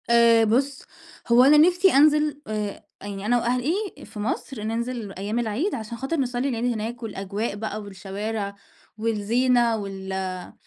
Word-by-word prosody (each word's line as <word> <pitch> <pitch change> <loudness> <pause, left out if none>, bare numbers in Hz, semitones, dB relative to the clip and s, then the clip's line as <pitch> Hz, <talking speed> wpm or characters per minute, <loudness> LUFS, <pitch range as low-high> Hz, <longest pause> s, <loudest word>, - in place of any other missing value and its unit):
آآ 235 -1 +6
بُصّ، 260 +5 +1 0.4
هو 240 +1 +6
أنا 290 +3 +7
نِفسي 360 +1 +3
أنزِل 300 +1 +4
آآ، 210 -2 -4 0.2
يعني 200 0 -6
أنا 245 +3 +3
وأهلي 250 +5 0 0.3
في 210 - -10
مصر 220 +1 -3
ننزِل 230 -1 -3
أيام 205 +5 -3
العيد 240 - -1
عشان 230 +1 -6
خاطر 270 +7 -2
نصلّي 255 0 -1
العيد 245 0 0
هناك 230 +2 -5
والأجواء 200 0 -3
بقى 215 0 -4
والشوارع 200 +1 -5 0.4
والزينة 230 +2 +2
وال 190 -2 -5
230 Hz, 140 wpm, -24 LUFS, 205-250 Hz, 0.4 s, أنا